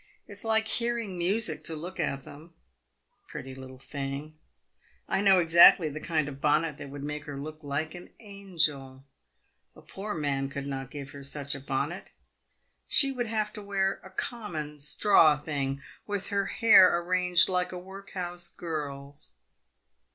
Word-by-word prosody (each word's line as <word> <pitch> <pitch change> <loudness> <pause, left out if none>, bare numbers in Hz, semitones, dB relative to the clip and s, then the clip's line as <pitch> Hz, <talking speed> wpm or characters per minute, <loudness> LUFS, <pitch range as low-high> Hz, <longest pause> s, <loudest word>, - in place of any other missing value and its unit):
It - - -14
is 200 0 -3
like 220 0 +1
hearing 235 -4 0
music 175 -1 +2
to 160 - -2
look 175 +4 -8
at 135 -4 -2
them! 165 +4 -14 0.7
Pretty 130 0 -8
little 130 0 -11
thing! 140 +3 -6 0.7
I - - 0
know 195 -2 +6
exactly 170 -1 +7
the 150 +1 -6
kind 155 -2 -1
of 140 -1 -8
bonnet 150 0 +1
that 140 - -8
would 140 0 -8
make 150 0 -5
her 145 -2 -7
look 155 +2 -7
like 150 +2 -3
an 175 0 -10
angel. 160 - -3 0.7
A - - -15
poor 205 +1 -6
man 140 -3 -1
could 140 0 -5
not 135 -2 -5
give 145 -1 -8
her 140 -1 -10
such 140 +1 -4
a 135 - -5
bonnet. 140 +6 -3 0.8
She 275 -2 +4
would 245 -3 -3
have 215 -1 -2
to 210 - -8
wear 195 -1 -1
a 190 - -11
common 175 - -5
straw 155 +1 +5
thing, 140 -2 -3 0.2
with 205 -2 -4
her 200 -2 0
hair 210 -6 +6
arranged 180 0 +3
like 180 -1 0
a 180 - -6
workhouse 180 -2 -4
girl's. 140 - -6
160 Hz, 160 wpm, -28 LUFS, 140-195 Hz, 0.8 s, exactly